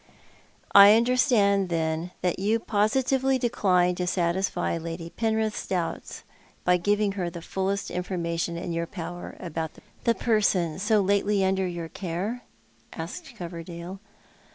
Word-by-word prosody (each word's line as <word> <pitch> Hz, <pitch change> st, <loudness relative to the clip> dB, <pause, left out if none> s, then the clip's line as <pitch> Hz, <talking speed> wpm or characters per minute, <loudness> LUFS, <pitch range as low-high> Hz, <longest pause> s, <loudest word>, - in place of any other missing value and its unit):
" -, -, -32 dB, 0.3 s
I 200 Hz, +1 st, +9 dB
understand, 225 Hz, -5 st, +3 dB
then, 160 Hz, 0 st, -1 dB
that 180 Hz, -1 st, 0 dB
you 210 Hz, +4 st, +2 dB
positively 260 Hz, +5 st, +1 dB
decline 185 Hz, -7 st, +2 dB
to 180 Hz, -, -2 dB
satisfy 175 Hz, 0 st, 0 dB
Lady 165 Hz, 0 st, -6 dB
Penrith's 220 Hz, +2 st, -1 dB
doubts 175 Hz, -3 st, -3 dB, 0.4 s
by 180 Hz, 0 st, +4 dB
giving 205 Hz, +3 st, +1 dB
her 185 Hz, -3 st, -2 dB
the 170 Hz, -, -8 dB
fullest 195 Hz, +2 st, -2 dB
information 170 Hz, -2 st, -2 dB
in 170 Hz, 0 st, -4 dB
your 165 Hz, 0 st, -2 dB
power 175 Hz, -2 st, -7 dB
about 165 Hz, -2 st, -4 dB, 0.3 s
the 235 Hz, -, +3 dB
person 195 Hz, -7 st, +1 dB
so 210 Hz, +1 st, +3 dB
lately 200 Hz, 0 st, +2 dB
under 190 Hz, 0 st, +1 dB
your 170 Hz, -2 st, -5 dB
care? 190 Hz, +8 st, -4 dB, 0.3 s
" 115 Hz, 0 st, -22 dB
asked 165 Hz, +1 st, -7 dB
Coverdale. 170 Hz, +1 st, -7 dB
185 Hz, 135 wpm, -26 LUFS, 170-205 Hz, 0.4 s, I